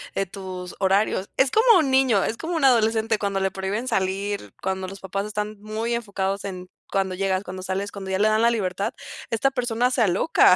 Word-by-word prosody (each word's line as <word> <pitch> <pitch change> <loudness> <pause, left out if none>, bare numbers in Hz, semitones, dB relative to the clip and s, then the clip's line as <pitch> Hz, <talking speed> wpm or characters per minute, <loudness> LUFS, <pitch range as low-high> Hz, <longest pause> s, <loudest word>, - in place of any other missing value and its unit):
de 195 - +1
tus 185 -1 -7
horarios. 195 0 +1
Es 265 0 +3
como 450 -3 +6
un 285 -5 +1
niño, 260 -7 +4
es 225 - -2
como 335 +2 -3
un 320 - -1
adolescente 225 -3 +3
cuando 200 -2 -1
le 195 0 +1
prohíben 200 +6 -3
salir, 190 - -1
cuando 190 0 -2
los 195 +1 -9
papás 195 +1 -3
están 210 0 -4
muy 220 +2 -3
enfocados 200 -4 -2
en: 185 -2 -6 0.2
"¿Cuándo 195 -1 0
llegas, 190 0 0
cuándo 185 -1 -7
sales?". 195 +2 -3
Cuando 195 -1 -7
ya 190 - 0
le 215 +1 +4
dan 215 +1 +2
la 235 +1 +5
libertad, 200 -1 -1 0.4
esta 230 +4 +2
persona 245 -1 0
se 255 - +1
aloca 195 - +5
200 Hz, 205 wpm, -24 LUFS, 190-230 Hz, 0.4 s, como